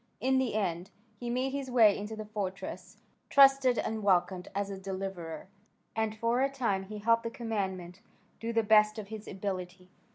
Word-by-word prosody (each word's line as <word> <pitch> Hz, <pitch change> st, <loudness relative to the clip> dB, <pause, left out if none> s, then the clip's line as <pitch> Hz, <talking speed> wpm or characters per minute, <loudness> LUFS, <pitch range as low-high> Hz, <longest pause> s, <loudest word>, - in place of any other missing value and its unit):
In 265 Hz, +1 st, +2 dB
the 255 Hz, -5 st, -1 dB
end 180 Hz, -3 st, -1 dB, 0.3 s
he 240 Hz, -, -4 dB
made 255 Hz, +2 st, 0 dB
his 275 Hz, -1 st, -4 dB
way 225 Hz, -5 st, +6 dB
into 210 Hz, +2 st, -5 dB
the 215 Hz, 0 st, -6 dB
fortress, 200 Hz, -3 st, -5 dB, 0.3 s
trusted 270 Hz, -3 st, +6 dB
and 220 Hz, 0 st, -2 dB
welcomed 185 Hz, -2 st, +1 dB
as 200 Hz, 0 st, -1 dB
a 195 Hz, -, -5 dB
deliverer, 190 Hz, -4 st, -5 dB, 0.5 s
and 220 Hz, -1 st, -1 dB
for 230 Hz, +3 st, +1 dB
a 275 Hz, -, +3 dB
time 230 Hz, -8 st, -1 dB
he 210 Hz, +2 st, -7 dB
helped 230 Hz, +2 st, +3 dB
the 230 Hz, -, -3 dB
commandant 190 Hz, -6 st, -4 dB, 0.4 s
to 230 Hz, +1 st, -3 dB
the 225 Hz, -1 st, +2 dB
best 210 Hz, 0 st, +5 dB
of 205 Hz, -2 st, -7 dB
his 220 Hz, -1 st, -8 dB
ability. 185 Hz, -2 st, -5 dB
215 Hz, 175 wpm, -30 LUFS, 190-230 Hz, 0.5 s, way